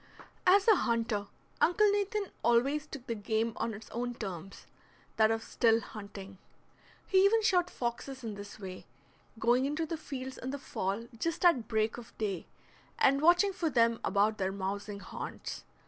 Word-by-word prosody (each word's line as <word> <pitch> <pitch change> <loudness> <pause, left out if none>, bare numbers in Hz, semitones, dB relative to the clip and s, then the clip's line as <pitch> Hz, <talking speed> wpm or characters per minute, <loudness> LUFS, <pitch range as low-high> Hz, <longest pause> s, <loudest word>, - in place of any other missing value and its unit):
As 390 +3 +6
a 435 -4 +7
hunter 225 -3 0 0.3
Uncle 410 +4 +5
Nathan 405 0 -1
always 275 +6 +2
took 275 -5 -9
the 235 - -2
game 220 +1 -1
on 225 -1 -2
its 215 - -11
own 245 +1 -3
terms, 195 -4 -7 0.5
that 220 0 +5
of 225 0 0
still 225 -1 +3
hunting. 200 -3 -9 0.7
He 380 0 +4
even 440 +3 +4
shot 360 -4 +3
foxes 255 +1 -4
in 225 -2 -4
this 205 +1 -9
way, 185 - -8 0.5
going 240 +3 +3
into 305 +3 -1
the 325 +1 -4
fields 265 -3 -6
in 255 - -5
the 280 - -3
fall 220 -4 -3
just 330 +4 -1
at 265 -11 +4
break 220 0 0
of 235 - -14
day, 200 -5 -3 0.5
and 275 +1 +4
watching 350 +5 +5
for 340 -3 -1
them 230 -3 +3
about 210 +2 +2
their 190 0 0
mousing 200 +1 -4
haunts. 185 - -7
235 Hz, 165 wpm, -31 LUFS, 210-305 Hz, 0.7 s, a